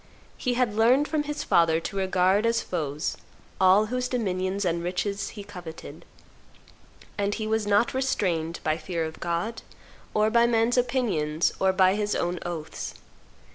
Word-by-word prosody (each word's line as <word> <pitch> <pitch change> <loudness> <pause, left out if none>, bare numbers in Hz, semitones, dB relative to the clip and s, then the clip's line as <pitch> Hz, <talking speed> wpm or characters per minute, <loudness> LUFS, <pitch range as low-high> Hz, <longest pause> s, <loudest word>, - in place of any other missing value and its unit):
He 250 -2 -1
had 245 -4 +1
learned 245 +7 +4
from 300 -1 -1
his 295 0 -3
father 165 -1 +3
to 170 - -6
regard 190 +2 +2
as 230 0 +2
foes 150 -4 -3 0.4
all 190 +3 +5
whose 250 +3 -2
dominions 195 -5 -1
and 170 -1 0
riches 200 +3 -2
he 205 - -6
coveted; 180 -5 -10 1.1
and 200 0 0
he 220 - -3
was 220 -1 0
not 205 +3 +3
restrained 180 -11 -1
by 155 0 +1
fear 170 -3 -2
of 160 0 -8
God, 175 +7 -2 0.5
or 215 +1 +3
by 235 0 +5
man's 230 0 +2
opinions, 195 - +1
or 190 0 +3
by 185 0 +4
his 210 0 -1
own 175 0 -1
oaths. 165 -3 -5
200 Hz, 155 wpm, -26 LUFS, 175-230 Hz, 1.1 s, all